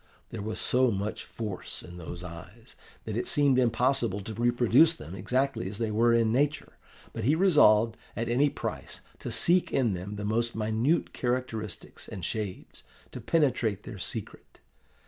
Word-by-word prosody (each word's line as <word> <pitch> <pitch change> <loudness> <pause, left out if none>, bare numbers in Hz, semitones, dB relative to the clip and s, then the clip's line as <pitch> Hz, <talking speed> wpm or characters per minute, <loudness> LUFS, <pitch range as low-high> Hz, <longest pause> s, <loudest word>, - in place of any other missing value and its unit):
There 115 - -5
was 110 +1 -3
so 130 0 +3
much 100 0 -3
force 105 -5 -5
in 90 0 -11
those 85 +1 -7
eyes, 90 +7 -11 0.3
that 110 - -5
it 120 - -2
seemed 140 -3 +3
impossible 120 -3 +2
to 110 +3 -6
reproduce 120 +7 +4
them 85 - -10
exactly 125 +2 -1
as 100 - -7
they 110 -1 -1
were 115 +3 +3
in 115 -1 +3
nature. 145 +5 0 0.4
But 115 - -4
he 145 +5 +4
resolved, 115 - +5 0.2
at 115 +2 -2
any 130 +5 +3
price, - - -6 0.2
to - - -5
seek 180 +1 +3
in 120 -6 +2
them 95 +3 -5
the 105 0 -5
most 115 +2 0
minute 110 +8 0
characteristics 120 -5 -4
and 90 - -6
shades, 105 -1 -5 0.3
to - - -7
penetrate 120 - +1
their 105 - -8
secret. - - -7
115 Hz, 165 wpm, -28 LUFS, 105-130 Hz, 0.4 s, resolved